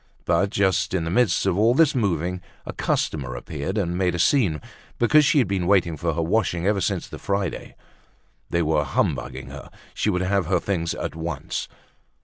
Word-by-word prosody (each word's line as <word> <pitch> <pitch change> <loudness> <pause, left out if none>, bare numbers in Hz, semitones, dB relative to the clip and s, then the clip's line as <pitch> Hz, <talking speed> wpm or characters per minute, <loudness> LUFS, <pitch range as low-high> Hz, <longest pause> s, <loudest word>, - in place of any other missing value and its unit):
But 95 +4 +2
just 95 -1 +1
in 90 - 0
the 80 - -3
midst 110 -3 +2
of 95 -3 +2
all 115 +3 +4
this 155 -1 +4
moving 90 - -1 0.2
a - - -6
customer 70 -5 -1
appeared 75 - -5
and 85 -4 -1
made 90 -1 +1
a - - -2
scene 90 - +2 0.4
because 150 +6 +5
she 150 - +3
had 125 -7 +4
been 95 -2 -1
waiting 90 -4 +3
for 80 +1 -2
her 85 - 0
washing 90 -1 0
ever 100 -1 +2
since - - -1
the - - -9
Friday; 100 -3 -3 0.7
they 85 0 +1
were 75 -1 +2
humbugging 65 -1 -2
her, 70 0 -10 0.2
she - - 0
would 90 -3 0
have 95 -2 0
her 90 -1 +2
things 85 -3 -2
at - - -4
once. 80 -4 -4
90 Hz, 190 wpm, -23 LUFS, 80-100 Hz, 0.7 s, because